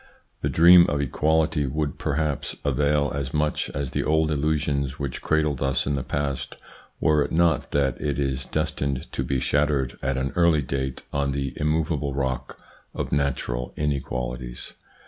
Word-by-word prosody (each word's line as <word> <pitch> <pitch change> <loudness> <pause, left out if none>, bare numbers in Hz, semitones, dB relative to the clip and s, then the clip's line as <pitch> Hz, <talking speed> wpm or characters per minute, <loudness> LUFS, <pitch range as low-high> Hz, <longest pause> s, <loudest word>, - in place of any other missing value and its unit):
The - - 0
dream 85 +1 +8
of 75 - 0
equality 75 +2 +1
would 75 +1 -2
perhaps 75 -1 -1
avail 70 +1 +2
as 70 0 -3
much 75 0 0
as 70 -2 -4
the - - -1
old 80 0 +2
illusions 70 -2 0
which 70 -3 -4
cradled 75 -4 +1
us 65 -1 +1
in 70 - 0
the 70 - -1
past, 70 -1 -3 0.4
were 75 -2 +3
it 70 - -5
not 85 -1 +2
that 65 -4 0
it 70 -3 -1
is 65 -2 -1
destined 70 -4 -2
to - - -2
be 65 -1 -1
shattered 70 -2 0
at 65 -1 -1
an 65 +1 -2
early 85 -4 +4
date 65 0 -3
on 70 -1 0
the 70 -1 -2
immovable 75 -2 0
rock 65 -2 -2 0.4
of - - -3
natural 60 -3 -1
inequalities. 60 -4 -3
70 Hz, 160 wpm, -25 LUFS, 65-75 Hz, 0.4 s, dream